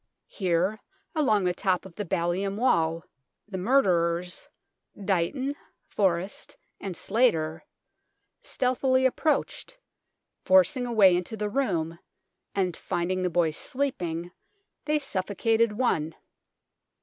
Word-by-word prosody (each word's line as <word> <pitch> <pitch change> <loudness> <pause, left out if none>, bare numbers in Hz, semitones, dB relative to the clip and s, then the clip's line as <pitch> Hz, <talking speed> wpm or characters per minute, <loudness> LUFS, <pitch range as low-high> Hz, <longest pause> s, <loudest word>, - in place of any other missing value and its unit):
Here, 185 +2 0 0.3
along 240 - +2
the 180 -1 +1
top 185 -1 0
of 190 - -11
the 205 +3 -5
ballium 175 +4 -1
wall, 165 -9 +2 0.4
the 190 -3 -5
murderers, 180 -6 +1 0.5
Dighton, 205 +9 -1 0.3
Forrest, 190 - -1 0.2
and 185 -4 -5
Slater, 160 -10 +1 0.8
stealthily 260 0 +1
approached, 310 - 0 0.7
forcing 280 -2 +4
a - - -4
way 195 -5 +6
into 180 +5 -3
the 210 0 -2
room, 170 -11 -1 0.6
and, 185 -4 0
finding 185 +2 -2
the 180 - +1
boys 165 -2 +1
sleeping, 175 -11 -2 0.5
they 300 0 +2
suffocated 225 -2 0
one. 165 -10 0
195 Hz, 105 wpm, -27 LUFS, 175-250 Hz, 0.8 s, way